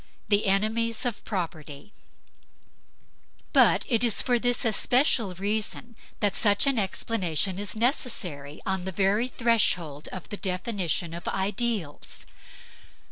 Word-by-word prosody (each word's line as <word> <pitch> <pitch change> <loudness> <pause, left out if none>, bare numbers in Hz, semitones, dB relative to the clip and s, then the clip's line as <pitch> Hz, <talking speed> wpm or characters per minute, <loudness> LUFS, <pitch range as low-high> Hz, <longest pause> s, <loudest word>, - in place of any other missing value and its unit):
THE 205 0 +3
ENEMIES 220 +4 +1
OF 240 -4 -3
PROPERTY 165 -3 -5 1.6
But - - +5
it 235 -2 +2
is 230 -4 +3
for 245 -1 +2
this 245 +1 +2
especial 225 -2 +2
reason 215 +4 -2 0.3
that 205 -1 +2
such 205 +1 +4
an 275 -4 +2
explanation 190 -3 -1
is 205 -1 -4
necessary 205 - -2
on 190 -2 -1
the 190 - -2
very 200 +5 +2
threshold 185 - 0
of 185 - -8
the 205 - -5
definition 180 -3 -2
of 170 - -7
ideals. 195 -4 -2
205 Hz, 120 wpm, -27 LUFS, 180-230 Hz, 1.6 s, But